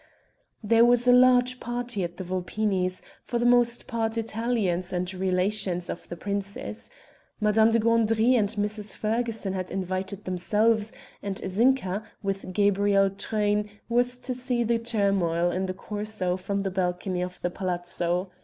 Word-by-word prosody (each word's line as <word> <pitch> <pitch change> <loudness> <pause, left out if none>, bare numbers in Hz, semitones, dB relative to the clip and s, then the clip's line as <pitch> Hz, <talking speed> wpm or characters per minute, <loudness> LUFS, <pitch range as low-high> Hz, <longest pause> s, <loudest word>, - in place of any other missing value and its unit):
There 230 +2 +5
was 245 0 +4
a 245 - +7
large 250 0 +5
party 240 -4 -3
at 175 0 -5
the 185 - -5
Vulpinis', 185 +1 -1 0.2
for 240 - -2
the 240 - 0
most 240 -1 +3
part 225 -1 -2
Italians 220 -6 -1
and 180 +1 -2
relations 185 0 -1
of - - -9
the 175 - -5
prince's. 200 +2 -4 0.5
Madame 220 +1 +4
de 230 - +3
Gandry 230 +1 +3
and 215 -5 +3
Mrs. 210 0 -3
Ferguson 225 -2 -1
had 185 -1 -3
invited 190 +1 -3
themselves, 210 +4 +1 0.3
and 200 -1 -3
Zinka, 210 -1 +2 0.2
with 195 -1 -3
Gabrielle 200 0 +3
Truyn, 210 +1 -1 0.2
was 245 +1 +2
to 255 +1 -4
see 250 -1 0
the 230 0 +1
turmoil 195 -7 +1
in 190 +1 -1
the 185 - -2
Corso 205 -3 -2
from 195 +2 -2
the 195 -1 -2
balcony 180 0 -1
of 180 0 -5
the 175 - -1
palazzo. 175 0 -2
205 Hz, 150 wpm, -26 LUFS, 185-230 Hz, 0.5 s, a